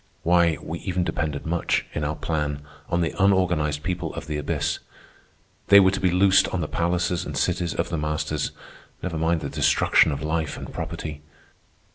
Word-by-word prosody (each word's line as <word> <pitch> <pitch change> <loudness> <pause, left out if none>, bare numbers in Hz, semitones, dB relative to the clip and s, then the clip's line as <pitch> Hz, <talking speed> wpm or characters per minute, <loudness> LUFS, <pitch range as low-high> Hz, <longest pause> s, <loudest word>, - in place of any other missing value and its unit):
Why, 85 -2 +3
we 85 +2 -6
even 90 -2 -1
depended 75 -4 -2
much, 85 +1 0
in 75 - -2
our 75 +1 -1
plan, 75 -3 -2 0.3
on 85 -1 +1
the 80 - -1
unorganized 90 -7 +2
people 90 -3 -2
of - - -6
the 75 0 -3
abyss. 75 - -1 0.9
They 100 - +9
were 95 -1 +5
to 95 - -2
be 95 - +2
loosed 95 +2 +4
on 95 - -2
the 80 - -2
palaces 85 0 0
and - - -5
cities 90 -1 0
of 85 0 -1
the 85 - -2
masters. 75 0 -1 0.5
Never 85 -4 -3
mind 80 0 +1
the - - -3
destruction - - +3
of 70 0 -4
life 80 0 -2
and - - -8
property. 75 -1 -5
85 Hz, 180 wpm, -24 LUFS, 75-90 Hz, 0.9 s, They